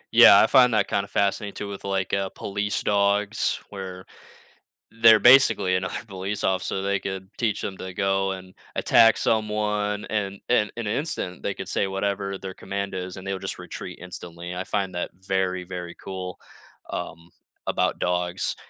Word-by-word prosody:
Yeah, - - +10
I - - +6
find 125 -3 +5
that - - +2
kinda 100 0 -1
fascinating 100 +1 0
too 105 - -5
with, 100 -1 -7
like, 95 -1 -2
uh, 95 -1 0
police 100 0 -3
dogs, 100 +1 +1
where 95 -2 -7 0.8
They're 115 -1 +6
basically 120 -7 +6
another 90 0 -2
police 100 +1 -4
officer, 95 0 0
they 100 0 0
could 95 0 -5
teach 110 -3 0
'em 95 - -3
to 95 0 -7
go 95 0 +1
and 95 -1 -8 0.2
attack 115 -1 +5
someone, 105 -1 0
and 100 -2 -3
and 105 -4 +3
in 115 -3 -3
an 105 - 0
instant, 140 - -3
they 100 - -1
could 95 - -7
say 95 - 0
whatever 100 0 -2
their 95 -1 -7
command 100 +1 -4
is, 90 0 -5
and 95 - -8
they'll 95 -1 -1
just - - -5
retreat - - -8
instantly, 90 -1 -7
I 90 - -3
find 95 -2 -2
that 90 - -3
very, 95 -1 -2
very 90 -1 -6
cool, 95 -1 -7 0.5
um, 85 0 -6 0.4
about - - 0
dogs, 90 0 -1
95 Hz, 170 wpm, -25 LUFS, 95-105 Hz, 0.8 s, Yeah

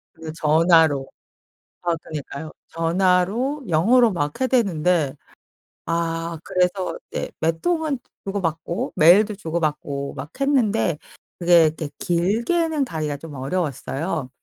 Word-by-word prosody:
그 160 -1 -8
전화로. 160 -3 +4 0.8
아 170 -1 +1
그러니까요. 155 0 -7 0.2
전화로 185 - +1
영어로 225 +9 +4
막 145 - -2
해 260 - +3
대는데 175 - +1 0.7
아 165 0 -2
그래서 185 +1 0
네 - - -3
몇 165 0 0
통은 320 -6 0 0.3
주고받고 170 -4 -3
메일도 195 +6 +5
주고받고 150 -5 -3
막 140 +2 -7
했는데 225 - +2 0.4
그게 170 -2 +5
그렇게 155 -1 -6
길게는 240 - +1
가기가 155 - -3
좀 150 +1 -10
어려웠어요. 140 0 -3
170 Hz, 255 characters per minute, -22 LUFS, 155-200 Hz, 0.8 s, 메일도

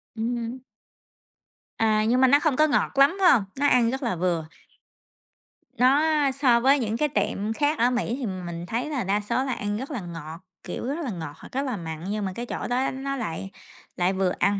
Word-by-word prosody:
Ừ 220 - -5
hứm. 240 +1 -3 1.2
À, 215 -1 +2
nhưng 250 +3 +3
mà 260 - +7
nó 285 +3 +6
không 305 -4 +1
có 310 +3 +4
ngọt - - +1
lắm, 280 +7 +5
phải 360 - +7
hông? 225 -7 +3 0.2
Nó 285 - +3
ăn 240 -3 +4
rất 265 +1 -4
là 230 -6 0
vừa. 170 -2 -1 1.3
Nó 265 +4 +5 0.3
so 255 -3 +3
với 270 +3 +4
những 225 -1 -1
cái 300 +2 +1
tiệm 220 -5 -1
khác 295 +4 0
ở 240 - +4
Mỹ 245 -1 -1
thì 260 - -3
mình 175 -4 -5
thấy 235 +8 -3
là 275 -7 -2
đa 200 +2 +1
số 235 +5 -1
là 265 -2 -2
ăn 205 0 -3
rất 265 +6 -6
là 255 - -3
ngọt, 165 -2 -8 0.2
kiểu - - -5
rất 290 +5 -2
là 255 - -3
ngọt 160 -6 -6
hoặc - - -13
rất 265 - -1
là 250 -5 -2
mặn, 160 -2 -6
nhưng 210 -1 -2
mà 190 - -3
cái 240 - -4
chỗ - - -4
đó 255 +2 0
nó 275 +1 -4
lại 195 -5 -5 0.5
lại 180 +2 +2
vừa 190 -1 +1
ăn 200 0 +2
235 Hz, 225 wpm, -25 LUFS, 195-265 Hz, 1.3 s, mà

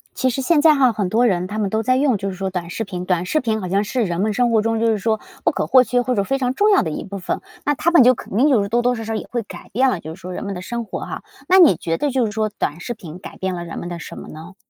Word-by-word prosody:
其 255 0 +1
实 270 - -3
现 295 +2 +3
在 310 -2 +6
哈， 260 -3 +4
很 210 -4 -2
多 230 +6 +3
人 180 -4 0
他 210 +2 -5
们 200 -3 0
都 220 0 0
在 255 +3 +2
用 265 -3 +2
就 195 0 -3
是 185 - -7
说 195 +1 -2
短 180 -2 -5
视 225 - -3
频， 180 -3 -5
短 180 -1 0
视 310 - +1
频 220 -4 -1
好 185 - -4
像 195 +3 +1
是 235 +3 -1
人 175 -2 -2
们 215 +2 +1
生 240 +2 +1
活 220 -2 +3
中 225 0 0
就 230 - +1
是 225 -1 +2
说 220 +2 0 0.3
不 - - +4
可 - - -2
或 255 - +6
缺 250 0 +1
或 250 +1 -1
者 200 - +1
非 270 +6 -1
常 255 -1 -1
重 415 +8 +3
要 400 - +5
的 160 - -3
一 - - -4
部 200 -1 -7
分。 180 - -3 0.2
那 290 - +2
它 335 - +1
们 340 -7 +6
就 255 +1 +6
肯 205 - -8
定 270 +6 +4
就 250 -8 +3
是 200 - -3
多 235 +3 +1
多 245 +1 +2
少 225 - -5
少 220 0 -3
也 - - -5
会 240 -1 -2
改 210 - -11
变 260 +4 +3
了 205 - -2
就 160 0 -8
是 185 - -16
说 185 0 -7
人 180 - -5
们 200 - -4
的 180 - -6
生 235 +4 -4
活 - - -6
哈， - - -6 0.2
那 375 +1 +6
你 345 -5 +7
觉 165 0 -2
得 290 - 0
就 255 -3 +2
是 - - -3
说 215 0 0
短 170 -6 -4
视 240 +7 -4
频 175 -6 -10
改 185 - -10
变 190 -1 -2
了 175 - -5
人 170 - -7
们 175 - -6
的 175 -1 -5
什 - - -9
么 - - -9
呢？ 160 +4 -10
220 Hz, 375 characters per minute, -20 LUFS, 185-250 Hz, 0.3 s, 你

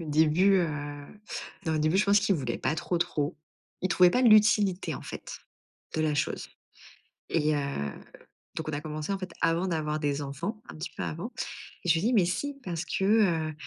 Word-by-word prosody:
Au 165 - -5
début, 160 +6 +4
heu, 170 -3 +1 1.0
non, 160 - +1
au - - +1
début, 155 +4 +2
je 205 - +4
pense 200 0 +5
qu'il 200 -2 +2
voulait 130 -6 -2
pas 150 - 0
trop, 170 +1 -1
trop. 155 -2 -1 0.5
Il 185 - +1
trouvait 180 0 +6
pas 250 - +2
l'utilité 210 -4 +4
en - - -7
fait, - - -7 0.6
de 160 - 0
la 155 -1 +1
chose 150 0 -2 0.8
et 155 -2 +2
heu, 145 - 0 0.9
donc 155 -1 -3
on - - -3
a 145 - -1
commencé 155 +2 -4
en 195 - -3
fait, 185 -2 -6
avant 170 +3 +2
d'avoir 155 -2 -1
des 145 -1 -1
enfants, 165 - -4
un - - -8
petit 160 +3 -6
peu - - -2
avant 175 +11 -4 0.5
et - - 0
je 165 - +7
lui 165 - 0
dis: 240 +3 +2
«Mais 200 -6 +5
si, 280 +11 -2
parce 175 -2 -3
que, 175 - -2
heu 175 -7 +3
170 Hz, 205 wpm, -28 LUFS, 155-195 Hz, 1.0 s, je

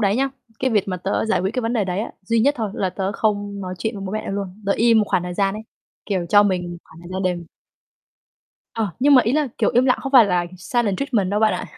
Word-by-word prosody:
đấy 200 0 +2
nhá, 270 +2 +1 0.3
cái 260 - 0
việc 210 -4 +1
mà 185 - -2
tớ 190 +2 -1
giải 220 - +1
quyết 190 - -1
cái 255 - 0
vấn 225 +1 -1
đề 225 -4 +1
đấy 185 +1 -2
ấy, 220 - -5
duy 230 +4 +1
nhất 280 +6 +3
thôi, 220 -3 -2
là 190 - -1
tớ 195 +1 -3
không 205 -1 -1
nói 185 -1 -5
chuyện 220 +6 -2
với 195 - -6
bố 190 - -5
mẹ 215 -1 -3
luôn. 200 0 -5
Tớ 200 - +3
im 230 +1 +4
một 215 - +3
khoảng 180 - +1
thời 180 0 -5
gian 195 +1 +1
ấy, 215 - -6 0.4
kiểu, 185 -4 -1
cho 205 +3 +6
mình 180 -3 -1
một 175 - -7
khoảng 160 - -16
thời 175 - -11
gian 190 +1 -2
để 180 -2 -1 1.3
Ờ. 225 -2 -1
Nhưng 280 +2 +6
mà 255 - +7
ý 230 +2 0
là, 300 -1 +1
kiểu, - - +2
im 250 +2 +4
lặng 250 - +3
không 270 - -4
phải 250 -5 +8
là 180 -3 +1
silent 210 0 -1
treatment 235 -9 0
đâu 205 - +1
bạn 220 0 +3
ạ. - - -4
205 Hz, 285 wpm, -21 LUFS, 190-230 Hz, 1.3 s, phải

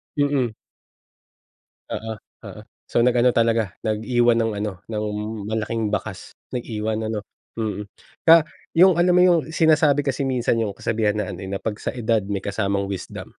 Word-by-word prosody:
Mm. 140 -6 +1 1.3
Oo-oo. 110 -1 -8 0.3
So, - - 0
nag-ano 125 0 +4
talaga, 115 -4 +1
nag-iwan 115 +2 +2
ng 115 -1 +1
ano, 105 - -2 0.2
ng 105 -1 -3 0.5
malaking 110 0 -1
bakas. 105 -2 -4 0.2
Nag-iwan 110 -2 -2
ano, 110 -1 -2 0.4
mm. 105 -1 -2 0.4
Kaya 165 -1 +9 0.3
yung 180 +1 +7
alam 180 +1 +4
mo 180 - +6
yung 175 -2 +5
sinasabi 155 -3 +3
kasi 135 +1 0
minsan 125 -2 +1
yung 105 -3 -1
kasabihan 110 -1 0
na 105 - -1
ano 90 - -8
eh, 95 - -6
na 100 - -2
'pag 110 - -3
sa - - -2
edad 115 -4 0
may 100 -1 -2
kasamang 100 -1 -1
wisdom. 95 -2 -7
115 Hz, 150 wpm, -23 LUFS, 105-125 Hz, 1.3 s, Kaya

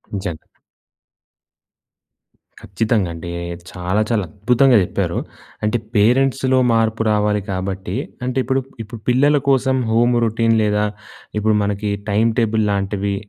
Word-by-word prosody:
నిజంగా. 95 -5 -4 2.2
ఖచ్చితంగా 110 -5 -1
అండి. 85 +1 -7 0.4
చాలా, 90 +4 -1
చాలా 110 -4 +1
అద్భుతంగా 120 - +3
చెప్పారు. - - -2 0.5
అంటే, 105 +3 +1 0.2
పేరెంట్స్‌లో 130 +4 +3 0.2
మార్పు 115 0 +1
రావాలి 105 0 +1
కాబట్టి 95 0 -4 0.3
అంటే 125 0 -2
ఇప్పుడు 135 +1 0 0.2
ఇప్పుడు 115 +1 -10
పిల్లల 140 +4 +4
కోసం 130 0 +2
హోమ్ 120 +2 +3
రొటీన్ 115 0 +2
లేదా, 105 0 +1 0.5
ఇప్పుడు 110 +1 +2
మనకి 100 +1 -2 0.2
టైం 110 +3 +3
టేబుల్ 110 -1 +1
లాంటివి, 100 0 -1
110 Hz, 115 wpm, -19 LUFS, 100-120 Hz, 2.2 s, పిల్లల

